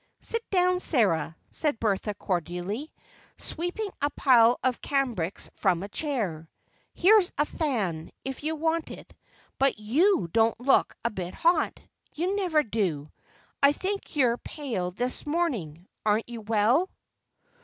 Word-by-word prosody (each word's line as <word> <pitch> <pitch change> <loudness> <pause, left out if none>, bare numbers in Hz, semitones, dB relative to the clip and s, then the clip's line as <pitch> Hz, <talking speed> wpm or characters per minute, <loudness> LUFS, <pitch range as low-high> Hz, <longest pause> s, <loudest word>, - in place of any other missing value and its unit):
"Sit 460 - -2
down, 365 -1 +3
Sarah," 200 - +2 0.2
said 295 -7 -1
Bertha 210 -1 0
cordially, 185 - -3 0.5
sweeping 355 +5 -3
a 285 - +2
pile 245 -4 +5
of 255 -1 0
cambrics 240 - -1
from 185 -3 +1
a 200 - -6
chair. 200 - -2 0.5
"Here's 390 0 +5
a 295 - +3
fan, 210 - -2 0.2
if 270 -1 -5
you 315 +1 -1
want 320 +1 -1
it, - - -11 0.5
but 270 -2 +3
you 290 - +2
don't 225 0 +3
look 265 +2 +3
a 235 - +2
bit 185 -3 -5
hot; 340 +1 +2 0.4
you 360 +5 0
never 350 -7 +2
do. 180 - -2 0.5
I 280 +1 +6
think 390 +2 -4
you're 245 -5 +3
pale 235 - -4
this 245 +10 -2
morning. 215 - -2 0.2
Aren't 215 +2 +1
you 235 -2 -6
well?" 225 - +2
245 Hz, 135 wpm, -27 LUFS, 200-315 Hz, 0.5 s, I